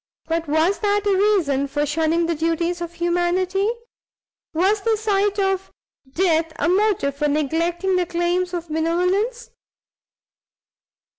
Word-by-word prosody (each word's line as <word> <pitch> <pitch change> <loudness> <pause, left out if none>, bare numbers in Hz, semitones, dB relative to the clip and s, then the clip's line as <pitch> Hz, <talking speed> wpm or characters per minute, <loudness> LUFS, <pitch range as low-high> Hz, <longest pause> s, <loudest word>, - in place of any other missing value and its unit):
but 330 0 -2
was 315 +6 +1
that 410 -1 +1
a 400 -1 +3
reason 360 -9 +2
for 290 +2 -1
shunning 320 +3 +1
the 335 - 0
duties 335 +2 -1
of 345 0 -5
humanity? 355 +3 0 0.8
was 385 +6 +1
the 450 +1 +1
sight 410 -1 0
of 385 -1 -1 0.4
death 325 -1 +1
a - - -1
motive 370 -7 +1
for 295 +1 0
neglecting 335 +5 0
the 360 - +1
claims 350 +1 0
of 345 -1 -4
benevolence? 360 +9 -1
345 Hz, 130 wpm, -21 LUFS, 325-390 Hz, 0.8 s, a